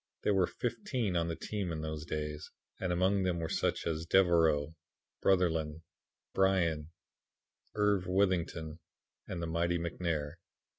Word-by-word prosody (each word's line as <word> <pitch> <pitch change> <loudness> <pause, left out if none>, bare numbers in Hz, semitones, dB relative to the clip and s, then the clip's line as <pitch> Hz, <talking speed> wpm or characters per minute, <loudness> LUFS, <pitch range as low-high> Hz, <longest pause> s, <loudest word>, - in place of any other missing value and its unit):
There 105 - +3
were 95 -3 +3
fifteen 115 -4 -2
on 85 -1 +1
the 85 - -2
team 100 -2 -3
in 80 -1 -3
those 80 0 -4
days, 75 -1 -4 0.3
and 95 - -1
among 95 +3 +2
them 90 -2 +1
were 80 - -2
such - - 0
men 85 - +1
as 80 +1 -6
Devereaux, 80 -5 +4 0.5
Brotherlin, 80 -4 +2 0.5
Bryan, 85 -5 +2 0.9
Irv. 105 -3 +2
Withington, 90 -4 0 0.5
and 85 -2 -4
the - - 0
mighty 85 +1 +1
McNair. 85 -2 -2
85 Hz, 140 wpm, -32 LUFS, 80-95 Hz, 0.9 s, Devereaux